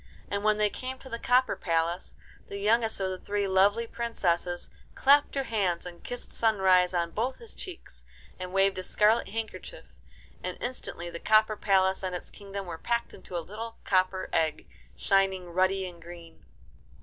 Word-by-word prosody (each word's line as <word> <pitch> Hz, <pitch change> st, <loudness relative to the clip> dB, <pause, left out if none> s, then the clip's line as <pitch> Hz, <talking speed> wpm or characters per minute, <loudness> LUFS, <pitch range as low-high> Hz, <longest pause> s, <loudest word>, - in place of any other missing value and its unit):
And 200 Hz, 0 st, -1 dB
when 215 Hz, 0 st, +3 dB
they 210 Hz, -1 st, +2 dB
came 260 Hz, +1 st, -5 dB
to 260 Hz, -, -12 dB
the 230 Hz, -2 st, -4 dB
copper 250 Hz, +2 st, +3 dB
palace, 170 Hz, +1 st, -1 dB, 0.3 s
the 200 Hz, -, -6 dB
youngest 220 Hz, +2 st, +2 dB
of 190 Hz, -1 st, -1 dB
the 185 Hz, -, -5 dB
three 205 Hz, -1 st, -1 dB
lovely 200 Hz, +4 st, +4 dB
princesses 180 Hz, -7 st, -1 dB, 0.2 s
clapped 285 Hz, +2 st, +5 dB
her 275 Hz, -, +1 dB
hands 195 Hz, -9 st, 0 dB
and 175 Hz, -1 st, -10 dB
kissed 245 Hz, 0 st, -6 dB
Sunrise 190 Hz, -5 st, +4 dB
on 170 Hz, -1 st, 0 dB
both 245 Hz, +5 st, -1 dB
his 465 Hz, -, -14 dB
cheeks, 365 Hz, -3 st, -8 dB, 0.4 s
and 185 Hz, 0 st, -5 dB
waved 195 Hz, 0 st, +3 dB
a -, -, -4 dB
scarlet 215 Hz, +4 st, +3 dB
handkerchief, 225 Hz, -, -6 dB, 0.6 s
and -, -, -4 dB
instantly 175 Hz, -8 st, -5 dB
the 170 Hz, -, -6 dB
copper 215 Hz, +2 st, +4 dB
palace 190 Hz, -2 st, +2 dB
and 185 Hz, -1 st, -3 dB
its 180 Hz, -, -7 dB
kingdom 200 Hz, -1 st, -7 dB
were 165 Hz, -2 st, -6 dB
packed 235 Hz, +4 st, -1 dB
into 180 Hz, -, -7 dB
a 165 Hz, -, -4 dB
little 225 Hz, +3 st, -7 dB
copper 185 Hz, 0 st, +1 dB
egg, 160 Hz, -1 st, +1 dB, 0.3 s
shining 190 Hz, -2 st, +1 dB
ruddy 190 Hz, +1 st, +2 dB
and 175 Hz, -2 st, -11 dB
green. 170 Hz, -1 st, -12 dB
195 Hz, 175 wpm, -29 LUFS, 180-225 Hz, 0.6 s, clapped